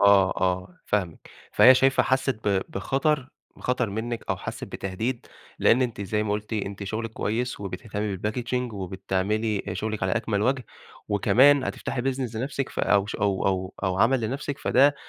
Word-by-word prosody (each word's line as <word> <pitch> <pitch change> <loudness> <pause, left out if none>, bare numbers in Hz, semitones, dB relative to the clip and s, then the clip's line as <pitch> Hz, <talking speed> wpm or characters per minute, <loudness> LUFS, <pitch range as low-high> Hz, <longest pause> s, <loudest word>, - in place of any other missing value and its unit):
آه، 100 -2 +6
آه 90 0 -1
فاهمِك. 95 -6 -2 0.2
فهي 130 +1 +8
شايفة 135 +1 +4
حسّت 130 -5 0
ب 95 -1 +2
بخطر 135 +6 0 0.3
بخطر 125 -4 -1
منِّك 115 +3 -4
أو - - +1
حسّت - - -6
بتهديد، 110 +6 -4 0.3
لإن 125 +3 +4
أنتِ 120 -4 -2
زي 105 +2 -1
ما 105 -1 -1
قلتِ، 105 +2 -4
أنتِ 100 -1 -3
شُغلِك 110 +3 -3
كويس 120 +2 -2
وبتهتمّي 100 +1 -4
بالPackaging 120 +4 -2
وبتعملي 95 +3 -1
شُغلِك 110 -2 -3
على 95 - +1
أكمل 110 -3 0
وَجه، 130 +1 +1 0.4
وكمان 130 +7 +5
هتفتحي 125 - -3
Business 130 -3 -2
لنفسِك 135 +3 -2
فأو 100 -1 +2
ش - - -5
أو 100 -2 0
أو 95 0 -1
أو 95 -1 0
عمل 120 +3 +4
لنفسِك، 135 +5 -3
فده 140 +3 +4
110 Hz, 160 wpm, -26 LUFS, 100-125 Hz, 0.4 s, فهي